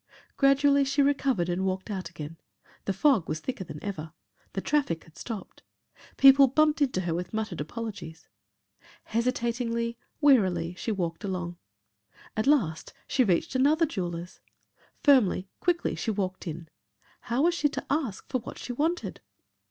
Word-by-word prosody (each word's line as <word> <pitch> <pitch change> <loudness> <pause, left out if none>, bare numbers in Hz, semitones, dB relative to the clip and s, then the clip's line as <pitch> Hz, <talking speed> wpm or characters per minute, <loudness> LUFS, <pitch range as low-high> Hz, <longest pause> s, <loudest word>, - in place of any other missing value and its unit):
Gradually 280 0 +4
she 275 +1 +2
recovered 275 -10 +1
and 180 +1 -1
walked 190 +2 -2
out 185 -4 -4
again. 160 -1 -8 0.5
The - - 0
fog 205 - +3
was 155 - -2
thicker 245 +3 -4
than 155 - -8
ever. 160 -6 -5 0.4
The - - -2
traffic 275 - 0
had 165 - -20
stopped. 215 +1 -7 0.6
People 275 0 +8
bumped 305 +3 +2
into 255 -10 +2
her 175 -2 -1
with 175 +4 -4
muttered 215 -7 -3
apologies. 195 -3 -7 0.8
Hesitatingly, 235 0 -1 0.2
wearily, 190 - +3
she 205 +5 -3
walked 175 -3 -3
along. 180 -3 -3 0.8
At 215 +4 0
last, 200 - +1
she 260 - +2
reached 185 -1 +1
another 295 +6 +4
jeweller's. 180 - -5 0.6
Firmly, 240 -9 +4
quickly 345 -1 +1
she - - -3
walked 190 -4 -2
in. 165 +1 -6 0.5
How 245 +4 -1
was 345 +1 +4
she 295 -3 +1
to - - -5
ask 275 -9 -1
for 255 - -1
what 230 - -9
she 245 - -5
wanted? 320 +7 -1
220 Hz, 150 wpm, -28 LUFS, 180-275 Hz, 0.8 s, People